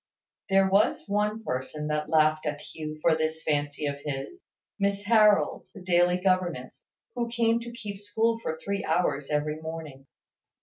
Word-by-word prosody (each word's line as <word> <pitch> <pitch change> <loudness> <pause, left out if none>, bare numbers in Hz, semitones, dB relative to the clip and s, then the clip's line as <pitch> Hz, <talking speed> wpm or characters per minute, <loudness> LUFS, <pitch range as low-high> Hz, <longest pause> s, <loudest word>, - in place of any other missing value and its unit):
There 195 0 +4
was 195 +2 +3
one 210 +2 0
person 140 0 -4
that 150 0 -1
laughed 155 0 +3
at 145 -1 -2
Hugh 155 0 -7
for 165 - +5
this 160 0 -2
fancy 145 0 -1
of 140 -1 -2
his; 145 - -5 0.4
Miss 200 0 0
Harold, 210 -1 +4
the 195 - -9
daily 180 0 +3
governess, 180 -8 -1 0.3
who 240 -2 -2
came 230 0 +2
to 235 0 -7
keep 210 -5 -7
school 220 +3 0
for 160 -7 -3
three 200 +4 -3
hours 160 -4 0
every 150 +1 -1
morning. 160 -4 -8
175 Hz, 160 wpm, -27 LUFS, 150-205 Hz, 0.4 s, for